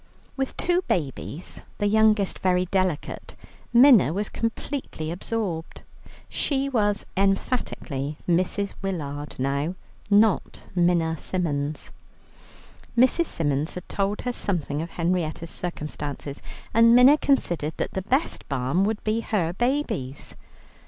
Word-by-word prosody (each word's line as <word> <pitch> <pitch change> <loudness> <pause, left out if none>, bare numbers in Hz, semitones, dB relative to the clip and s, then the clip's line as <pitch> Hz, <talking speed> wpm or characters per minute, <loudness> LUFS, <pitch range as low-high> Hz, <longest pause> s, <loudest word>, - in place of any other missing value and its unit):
With 270 -1 -3
two 355 +1 +2
babies, 150 +1 -3 0.2
the 205 - 0
youngest 215 -1 +3
very 180 -1 +2
delicate, 185 -4 -2 0.4
Minna 240 - +7
was 205 +2 -1
completely 230 - -4
absorbed. 180 -3 -3 0.4
She 275 -1 0
was 205 -5 +1
emphatically 190 - -1
Mrs. 185 +3 +1
Willard 150 -7 -4
now, 140 +6 -1 0.3
not 205 -1 +3
Minna 170 -3 +2
Symons. 150 -5 -2 1.1
Mrs. 260 +7 +4
Symons 145 -1 -1
had 180 - -7
told 200 +1 -1
her 245 - -2
something 160 -9 -1
of 165 - -5
Henrietta's 165 -2 -1
circumstances, 150 -4 -5 0.3
and 230 +1 +6
Minna 255 +4 +8
considered 175 - +1
that - - -2
the 190 - -2
best 265 - -1
balm 135 +6 +1
would 215 0 -2
be 215 +1 +1
her 185 -7 -1
babies. 240 - -2
185 Hz, 115 wpm, -25 LUFS, 155-220 Hz, 1.1 s, Minna